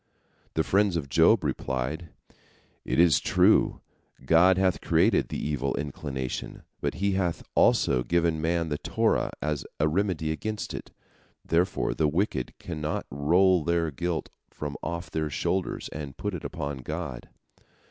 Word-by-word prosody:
The 80 - +2
friends 100 -1 +2
of 70 -4 -4
Job - - +5
replied: 65 +6 -2 0.7
"It - - -1
is 85 -6 +6
true, - - +3 0.4
God 90 +5 +5
hath 95 -2 +2
created - - +3
the - - -3
evil 70 -3 -1
inclination, 70 -3 -5 0.2
but - - -2
He 100 +2 0
hath 95 -3 -1
also 60 - +4
given 85 +2 +1
man 85 0 0
the 75 - -2
Torah - - +1
as 75 -2 -1 0.2
a 75 - +3
remedy 80 -2 0
against 105 +7 -4
it. - - -7 0.6
Therefore 90 +3 +1
the 80 - +1
wicked 80 -4 -1
cannot 75 -2 -4
roll 85 +5 +3
their 85 -1 +1
guilt 85 +3 -3 0.2
from 75 -1 -6
off 85 -2 -4
their 80 -1 -1
shoulders 90 +6 -2
and 70 -3 -7
put 105 -1 -3
it 90 - -5
upon 70 -2 -4
God." 65 - -5
80 Hz, 145 wpm, -27 LUFS, 75-90 Hz, 0.7 s, is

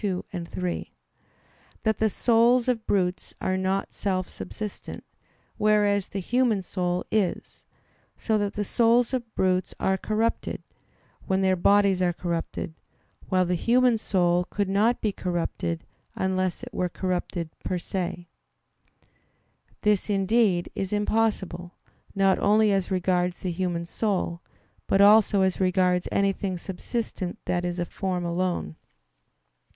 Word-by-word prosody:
2, 190 -4 -2
3) 175 0 -4 0.9
that 220 -1 +1
the 220 - +3
souls 235 +3 +3
of 235 -3 -1
brutes 185 -2 0
are 185 - 0
not 190 +1 -1
self 185 -2 -1
subsistent, 210 -2 -7 0.5
whereas 205 -2 +2
the - - -6
human 225 0 +1
soul 180 -1 -2
is; 210 -4 -1 0.5
so 220 - 0
that 205 -1 0
the 210 - -1
souls 235 +4 +3
of 240 -3 -3
brutes 185 0 +1
are 190 0 +1
corrupted, 220 +3 -1 0.6
when 190 0 +1
their 190 0 +3
bodies 195 +1 +3
are 175 -1 +2
corrupted; 170 -1 -4 0.6
while 185 -1 +3
the 180 - 0
human 245 +6 +3
soul 180 -5 +1
could 205 +1 -2
not 210 +5 +2
be 215 - +1
corrupted 170 - -3 0.3
unless 185 +1 -1
it 245 -2 -8
were 180 -2 -1
corrupted 175 -2 -3
per 180 - -1
se. 175 -1 -4 1.5
This, 210 0 +2
indeed, 195 -2 +2
is 195 -1 -3
impossible, 205 -4 -1 0.4
not 195 -1 +3
only 210 +1 +4
as 195 -2 0
regards 180 -1 0
the 185 - -2
human 170 -1 -2
soul, 180 -3 -2 0.5
but 195 - +2
also 205 0 +6
as 190 -1 0
regards 180 -1 +2
anything 195 -1 0
subsistent 190 0 -4
that 175 0 0
is 175 0 -2
a 175 - -1
form 180 -1 -3
alone. 170 - -2
190 Hz, 130 wpm, -26 LUFS, 180-210 Hz, 1.5 s, also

